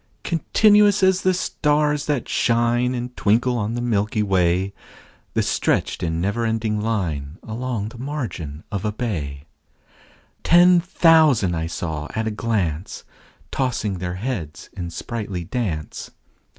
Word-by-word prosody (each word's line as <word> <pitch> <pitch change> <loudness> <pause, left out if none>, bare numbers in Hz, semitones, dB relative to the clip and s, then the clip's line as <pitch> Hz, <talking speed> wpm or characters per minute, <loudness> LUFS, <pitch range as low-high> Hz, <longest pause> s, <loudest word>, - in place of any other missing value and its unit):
Continuous 205 +4 +4
as 190 0 +4
the 185 - +3
stars 150 -4 0
that 145 -5 -1
shine 120 +2 +1
And 125 0 -5
twinkle 120 +4 +2
on 115 0 -2
the 120 - -2
milky 105 -2 0
way, 95 0 +1 0.6
The - - +2
stretched - - 0
in 80 -2 -1
never 100 +6 -1
ending 110 -2 -1
line 85 -9 -2
Along 115 -2 -3
the 115 - -12
margin 120 - -5
of 100 -3 -3
a 105 - 0
bay: 80 - -4 1.0
Ten 175 +1 +6
thousand 150 - +3
saw 80 -3 -4
I - - -1
at 110 - -3
a - - -1
glance, 100 -7 -2 0.5
Tossing 115 -8 -1
their 90 0 -3
heads 95 - -5
in 85 -2 -5
sprightly 100 -1 -5
dance. 90 -6 -4
110 Hz, 135 wpm, -22 LUFS, 90-130 Hz, 1.0 s, Ten